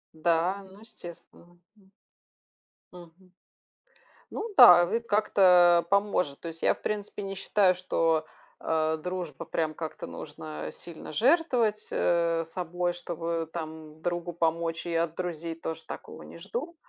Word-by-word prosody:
Да, 170 +4 +1
ну, 195 - -15
естественно, 175 -4 -12 0.2
м. 195 -2 -24 1.0
Мгм. 180 +1 -15 1.0
Ну 450 - -4
да, 175 -1 +10
ну 175 - -5
и - - +2
как-то, 190 -6 +5
а, - - +1
поможет, 195 -6 0
то - - -8
есть, 165 0 -7
я, - - +4
в - - -19
принципе, 210 -1 -4
не 195 0 -5
считаю, 195 -1 +2
что, 165 -3 +1 0.3
а, 160 0 0
дружба, 175 -3 -5
прям 155 -1 -1
как-то 160 -3 -6
нужно 75 0 -7
сильно 170 -2 -9
жертвовать, 240 - +2
э, 170 -1 +1
собой, 175 +1 -2
чтобы 170 -1 -4
там 160 -1 -7
другу 175 0 -3
помочь 165 0 -1
и 170 - -2
от 165 0 0
друзей 170 -2 -4
тоже 160 0 -6
такого - - -9
не - - -11
жду. 240 - -5
175 Hz, 140 wpm, -28 LUFS, 165-190 Hz, 1.0 s, да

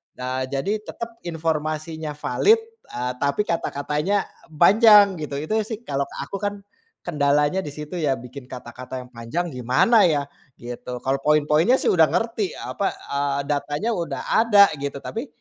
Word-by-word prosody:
Nah, 130 +1 -3
jadi 160 +11 -1
tetap 230 +2 -8
informasinya 155 -1 -3
valid, 415 - +3 0.3
eee, 125 +1 -3
tapi 140 +6 +1
kata-katanya 165 +2 -1 0.3
panjang 200 +2 +6
gitu. 150 -2 -5
Itu 215 +8 0
sih 225 0 -6
kalau 140 -7 -2 0.2
aku, 195 - -6
kan 205 0 -4 0.4
kendalanya 150 +1 +2
di 150 - -5
situ 150 +3 -8
ya 145 -4 +1
bikin 125 +2 -10
kata-kata 125 +1 -8
yang 125 - -16
panjang 115 +10 -3
gimana 130 - +3
ya 145 -3 +1 0.4
gitu. 120 +1 -7
Kalau 135 +1 0
poin-poinnya 150 - +4
sih - - -1
udah 165 -3 +5
ngerti, 205 +5 -1
apa, 200 - -3 0.2
eee, 140 0 0
datanya 145 +8 -1
udah 170 -3 -3
ada 210 -3 +6
gitu, 140 0 -4
tapi 235 +6 -5
150 Hz, 150 wpm, -23 LUFS, 140-200 Hz, 0.4 s, panjang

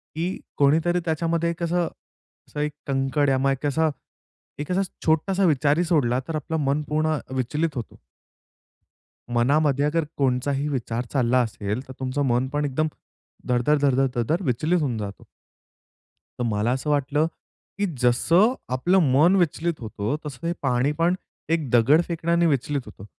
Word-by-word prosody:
की 170 +4 -2 0.2
कोणीतरी 160 +5 +3
त्याच्यामध्ये 165 +1 0
एक 170 +1 -4
असं 175 0 +1 0.6
असं - - -7
एक 150 0 0 0.2
कंकड 135 +1 +1
या 135 - +3
मग 135 +1 +2
एक 135 +2 -3
असा 160 +2 +2 0.7
एक 150 +4 -4
असा 190 +2 +2 0.2
छोटासा 185 +5 +2
विचारही 150 +1 +3
सोडला, 130 -7 +2
तर 165 - -3
आपलं 155 +2 -2
मन 140 +2 +1
पूर्ण 155 0 +1 0.2
विचलित 150 +5 -1
होतो. 120 -3 -7 1.4
मनामध्ये 140 +3 +3
अगर 160 +2 +1
कोणचाही 135 +2 0
विचार 120 -3 -2
चालला 125 -1 +3
असेल, 110 0 -3
तर 130 - -8
तुमचं 130 +2 -2
मन 125 0 +1
पण 145 0 0
एकदम 145 +3 0 0.6
धड-धड, 125 +5 +3
धड-धड, 135 -1 +3
धड-धड 135 - 0
विचलित 155 +8 +1
होऊन 125 -6 -1
जातं. 100 -2 -6 1.2
तर - - 0
मला 105 +2 0
असं 135 +4 -2
वाटलं, 145 +2 +1 0.5
की 205 - +1 0.2
जसं 165 - +4 0.2
आपलं 180 +9 +3
मन 165 +7 +5
विचलित 170 -2 0
होतो, 110 +1 -3
तसं 150 +2 -6
हे 170 - 0
पाणी 130 +1 +1
पण 170 +2 +3 0.4
एक 160 -5 -1
दगड 125 +7 +5
फेकण्याने 170 0 +1
विचलित 140 -1 0
होतं. 105 -1 -12
145 Hz, 155 wpm, -24 LUFS, 130-160 Hz, 1.4 s, मन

